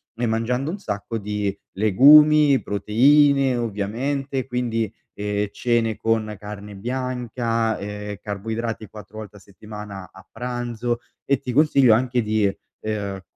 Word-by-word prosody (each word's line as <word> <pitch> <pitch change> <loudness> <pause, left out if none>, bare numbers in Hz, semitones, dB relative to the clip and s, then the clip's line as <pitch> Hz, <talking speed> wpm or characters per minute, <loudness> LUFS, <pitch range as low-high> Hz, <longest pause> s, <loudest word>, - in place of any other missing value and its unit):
e 120 +1 -1
mangiando 120 +6 -1
un 195 - -5
sacco 105 - -4
di 105 -1 -3 0.2
legumi, 145 +7 +6
proteine, 135 +6 +3
ovviamente, 125 +5 -2
quindi, 115 -4 -2 0.2
ehm, 105 0 -2
cene 115 -2 0
con 110 -1 -1
carne 105 0 -8
bianca, 120 -1 -2
ehm, 105 0 -6
carboidrati 110 +2 -4
4 105 +1 -12
volte 105 -1 -10
a - - -14
settimana 100 -1 -10
a 95 - -15
pranzo 120 0 -3 0.3
e, 140 -2 +1
ti 125 - -5
consiglio, 140 -4 +5
anche 125 +1 +1
di, 110 -1 +1 0.4
ehm 100 -3 -3
115 Hz, 125 wpm, -22 LUFS, 105-125 Hz, 0.4 s, legumi